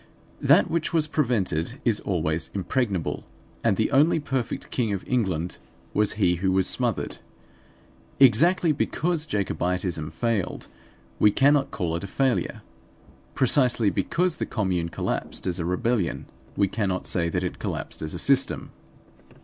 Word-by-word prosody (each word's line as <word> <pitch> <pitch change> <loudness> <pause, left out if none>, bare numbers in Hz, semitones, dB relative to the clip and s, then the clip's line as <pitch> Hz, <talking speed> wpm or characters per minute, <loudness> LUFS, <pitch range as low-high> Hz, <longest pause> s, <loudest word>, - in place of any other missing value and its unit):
That - - +5
which 165 0 -1
was 160 -2 +3
prevented 120 - -1
is 115 -4 +2
always 80 -4 -1
impregnable; 100 - -1 0.4
and 100 - +2
the 110 - +1
only 150 +4 +4
perfect 135 -5 -3
King 115 -5 0
of 95 - -5
England 95 -9 -1 0.3
was 105 0 +2
he 90 -5 +2
who 95 +2 +1
was 95 0 +3
smothered. - - -1 1.0
Exactly 160 - +5
be 145 - 0
cause 160 -1 -1
Jacobitism 90 - -1
failed 115 -4 -2 0.5
we 105 - +6
cannot 140 +6 +3
call 85 -4 -2
it 85 - -4
a - - -4
failure. 130 +5 0 0.7
Precisely 120 -5 +3
because 180 -1 0
the - - -3
Commune 90 -6 -1
collapsed - - -3
as 90 -1 -1
a 85 - -2
rebellion 90 +2 0 0.3
we 100 - +3
cannot 95 -3 -2
say 85 -2 0
that 90 +2 -1
it 90 - -4
collapsed - - -5
as 80 - -4
a - - -3
system. - - +1
105 Hz, 145 wpm, -25 LUFS, 90-135 Hz, 1.0 s, we